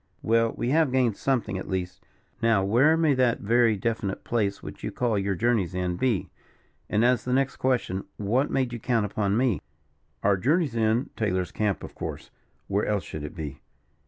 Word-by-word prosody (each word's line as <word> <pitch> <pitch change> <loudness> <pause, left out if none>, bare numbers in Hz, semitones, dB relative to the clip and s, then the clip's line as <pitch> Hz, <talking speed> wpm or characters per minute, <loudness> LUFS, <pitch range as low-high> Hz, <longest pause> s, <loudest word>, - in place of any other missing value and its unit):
"Well, 115 0 +3
we 120 - -1
have 155 -1 +3
gained 125 -5 +2
something 120 -8 -1
at - - -7
least. 90 -1 -3 0.4
Now 115 -4 +3
where 130 +11 +4
may 160 -3 +3
that 125 -3 +2
very 115 0 +3
definite 105 -2 -2
place, 100 -4 -1
which - - -9
you - - -3
call 120 -3 0
your 100 0 -1
journey's 110 -5 +1
end, 90 -1 -2
be? 120 -8 0 0.6
And, 110 +3 +2
as 125 -3 +3
the 125 - -1
next 135 +1 +1
question, 120 -7 0
what 120 +8 +1
made 130 -3 0
you 120 - -4
count 115 -2 +1
upon 100 0 0
me?" 125 -5 +1 0.6
"Our 100 -1 +3
journey's 140 - +1
end 115 +2 +1
Taylor's 95 -4 -1
camp, 105 -3 -1
of - - -8
course - - -6 0.4
where 100 +1 0
else 105 -2 0
should 75 - -7
it 75 - -7
be?" 75 -5 -6
115 Hz, 190 wpm, -26 LUFS, 100-125 Hz, 0.6 s, where